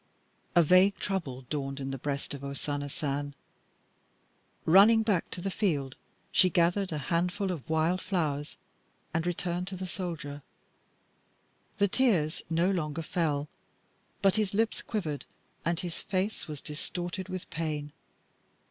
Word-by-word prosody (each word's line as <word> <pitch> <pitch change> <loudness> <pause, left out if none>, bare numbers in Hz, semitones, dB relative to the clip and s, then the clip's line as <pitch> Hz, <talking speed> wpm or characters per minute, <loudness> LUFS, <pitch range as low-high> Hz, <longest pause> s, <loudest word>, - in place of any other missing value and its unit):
A 175 - +8
vague 185 +5 +6
trouble 150 -10 -3
dawned 135 0 -3
in 135 0 -3
the 135 - -3
breast 140 +1 -2
of 140 -1 -7
O 140 0 -4
Sana 145 0 -2
San. 145 -1 -2 1.3
Running 205 +6 +7
back 205 -6 +1
to 175 - -5
the 195 +2 -1
field, 145 -11 0 0.4
she 185 - +5
gathered 175 +3 +2
a 155 - -1 0.2
handful 180 +3 +1
of 165 -2 -6
wild 160 +3 +2
flowers 150 -6 -1 0.6
and 165 +1 0
returned 175 +1 -1
to 195 - -5
the 185 0 -4
soldier. 165 -6 -4 1.4
The 200 - +4
tears 190 -9 +2
no 170 +3 +3
longer 165 -3 -1
fell, 150 -3 0 0.8
but 195 +1 +5
his 205 -2 +1
lips 225 +1 +1
quivered 160 -10 -3 0.4
and 170 +1 +1
his 175 -2 -4
face 190 +3 -1
was 150 -3 -6
distorted 175 +4 -4
with 185 -1 -4
pain. 150 -1 -2
170 Hz, 140 wpm, -30 LUFS, 145-190 Hz, 1.4 s, A